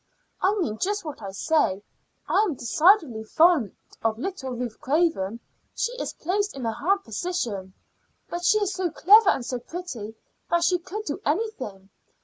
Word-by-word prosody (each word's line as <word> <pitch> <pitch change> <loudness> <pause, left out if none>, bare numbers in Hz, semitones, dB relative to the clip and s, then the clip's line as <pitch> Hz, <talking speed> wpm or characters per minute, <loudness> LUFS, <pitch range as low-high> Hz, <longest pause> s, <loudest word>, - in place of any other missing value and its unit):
"I 390 +3 +3
mean 310 - -2
just 410 -1 -1
what 300 -6 -7
I 200 - -5
say. 200 -1 +1 0.4
I - - +3
am 390 -9 0
decidedly 280 - +3
fond 315 - +3 0.3
of 225 -2 0
little 300 -1 -4
Ruth 245 -2 -5
Craven. 265 - +1 0.4
She 470 - 0
is - - -4
placed 405 +3 -1
in 265 -3 -5
a 225 - +1
hard 385 - 0
position, 225 - -3 0.5
but 345 0 -5
she 430 - +5
is 410 -1 0
so 370 -1 -1
clever 395 +6 +6
and 250 - +1
so 250 0 -3
pretty 245 - -7 0.3
that 340 0 +2
she 360 +1 +3
could 415 +5 -6
do 290 - -4
anything. 275 - -3
315 Hz, 165 wpm, -25 LUFS, 225-370 Hz, 0.5 s, clever